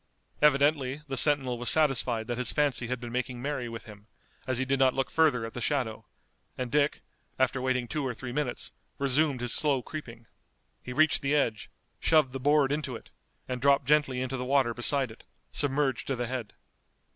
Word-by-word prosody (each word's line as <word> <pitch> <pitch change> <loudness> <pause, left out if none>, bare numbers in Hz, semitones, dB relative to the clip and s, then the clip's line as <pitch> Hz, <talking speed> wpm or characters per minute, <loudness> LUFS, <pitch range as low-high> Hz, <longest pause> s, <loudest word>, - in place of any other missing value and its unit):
Evidently 145 -1 +3
the 135 - -3
sentinel 135 -3 +3
was 120 - +2
satisfied 130 -7 +2
that 120 +1 -4
his 125 - +1
fancy 140 -5 0
had 125 0 -3
been 120 -1 -7
making 125 0 -3
merry 135 -2 -3
with 115 -1 -7
him, 105 -1 -13 0.4
as 130 -2 0
he 130 - 0
did 135 +1 0
not 130 -1 +4
look 135 0 -1
further 150 -8 +3
at 115 - -8
the 120 - -6
shadow, 115 -7 -1 0.5
and 125 -2 -4
Dick, 145 0 +1 0.3
after 130 0 +1
waiting 125 -1 0
two 150 +3 -3
or 130 -3 -3
three 130 +1 -7
minutes, 130 -2 -3 0.3
resumed 140 -1 +1
his 120 -1 0
slow 140 -5 +1
creeping. 120 -7 -8 0.6
He 125 - -8
reached 155 +3 +3
the 140 +2 +1
edge, 115 -7 0 0.3
shoved 155 -5 +3
the 135 - -4
board 145 0 +3
into 145 -4 -2
it, - - -12 0.4
and 125 -1 -4
dropped 140 0 +4
gently 135 -3 +2
into 130 +1 -3
the 125 - -3
water 130 -3 +2
beside 130 +1 +2
it, 110 - -15 0.3
submerged 140 -2 0
to 135 - -1
the 120 0 -2
head. 120 -3 -5
130 Hz, 195 wpm, -28 LUFS, 120-145 Hz, 0.6 s, not